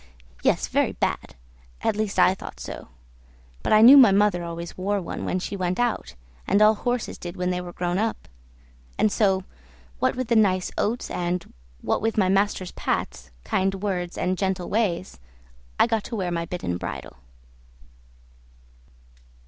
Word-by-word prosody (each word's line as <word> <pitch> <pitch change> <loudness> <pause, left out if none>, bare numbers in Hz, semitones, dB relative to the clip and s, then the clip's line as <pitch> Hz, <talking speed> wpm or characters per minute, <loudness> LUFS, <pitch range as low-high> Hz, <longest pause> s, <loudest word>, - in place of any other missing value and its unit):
yes, - - +1
very - - +1
bad! - - -3 0.5
at - - +1
least 215 -1 -2
I 185 - +5
thought 190 - -10
so; - - -8 0.7
but - - -2
I 215 0 +6
knew 265 +5 +10
my 250 -7 +8
mother 200 -3 +2
always 170 0 -6
wore 200 +2 -1
one 180 - -5
when - - -1
she 185 +2 -4
went 185 0 -2
out, 235 - -1 0.3
and 200 - +3
all 215 +1 +6
horses 245 +2 -3
did 175 0 -7
when 180 0 0
they 180 0 -2
were 175 -1 -8
grown 175 +1 -2
up; 225 +1 -2 0.7
and 215 0 +2
so, 195 -3 +2 0.6
what - - +1
with 255 -1 -3
the 235 - +3
nice 185 -4 +2
oats, 235 +4 -1
and 175 0 -3 0.3
what - - 0
with 225 +1 -1
my 190 -3 +3
master's 195 -1 +1
pats, - - -3
kind 195 - 0
words, 185 -3 -3
and 185 0 -1
gentle 190 -2 -1
ways, 175 - -1 0.6
I - - +7
got 225 -3 -1
to 235 - -5
wear 185 -4 -2
my 170 -1 -2
bit 180 - -6
and 90 0 -2
bridle. 65 - -7
190 Hz, 170 wpm, -24 LUFS, 180-215 Hz, 0.7 s, knew